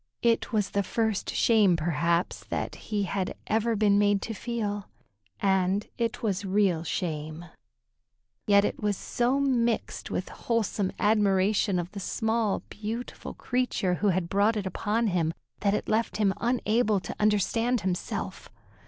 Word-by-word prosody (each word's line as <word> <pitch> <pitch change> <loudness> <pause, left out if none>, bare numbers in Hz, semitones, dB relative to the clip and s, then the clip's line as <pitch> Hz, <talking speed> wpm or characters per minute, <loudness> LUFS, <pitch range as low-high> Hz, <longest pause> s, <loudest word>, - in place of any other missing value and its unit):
It 230 +1 +2
was 210 -4 0
the 200 - +1
first 220 +1 -1
shame, 210 -6 +4
perhaps, 170 +2 0
that - - -3 0.2
he 210 -2 0
had 190 0 -2
ever 225 +1 +1
been 205 -1 +4
made 205 -1 +3
to 225 - -4
feel, 205 -2 -3 0.5
and 190 +1 +2
it 235 +1 -2
was 200 -3 0
real 190 -4 +2
shame, 155 -1 -3 1.0
yet 200 0 +5
it - - -3
was 205 -2 0
so 245 +3 0
mixed 240 -4 0
with - - -3
wholesome 215 -4 -1
admiration 200 -2 +2
of 175 0 -3
the 205 - -6
small, 220 +1 0
beautiful 220 +4 -6
creature 245 -7 0
who 210 - +3
had 185 -2 +1
brought 205 +4 +2
it 205 - -2
upon 210 +4 0
him, 170 -5 0 0.2
that 200 0 +2
it - - -3
left 220 0 0
him 205 -3 +2
unable 230 -3 +2
to 180 - -7
understand 215 +3 +2
himself. 190 +1 -3
205 Hz, 145 wpm, -27 LUFS, 190-225 Hz, 1.0 s, yet